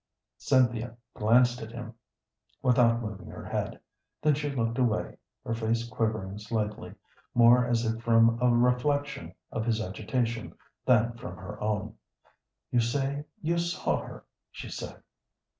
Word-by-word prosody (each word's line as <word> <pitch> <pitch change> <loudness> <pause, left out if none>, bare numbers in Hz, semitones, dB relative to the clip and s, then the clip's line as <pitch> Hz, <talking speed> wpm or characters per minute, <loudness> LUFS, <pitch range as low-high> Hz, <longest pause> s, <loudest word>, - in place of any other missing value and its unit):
Cynthia 120 -3 +2 0.2
glanced 120 +3 +3
at 110 0 -7
him 120 0 -7 0.7
without 120 -2 +4
moving 105 -3 -6
her - - -9
head, - - -3 0.4
then 150 0 +3
she 145 +1 -2
looked 115 -2 -1
away, 120 -4 0 0.3
her 115 - -1
face 115 +1 0
quivering 110 -3 -2
slightly, 105 0 -3 0.4
more 120 +1 +6
as 120 -1 +1
if 115 0 -1
from 115 0 +4
a 125 - +5
reflection 140 +4 +1 0.2
of 110 - -2
his 115 -1 +1
agitation 115 +3 -2 0.3
than 120 -2 +4
from 85 -6 -7
her 95 -1 -8
own. 105 0 -2 0.7
"You 120 - +3
say 135 +5 -1 0.2
you 170 +2 +1
saw 170 +1 0
her," - - -10 0.2
she - - -8
said. - - -7
115 Hz, 140 wpm, -29 LUFS, 110-125 Hz, 0.7 s, more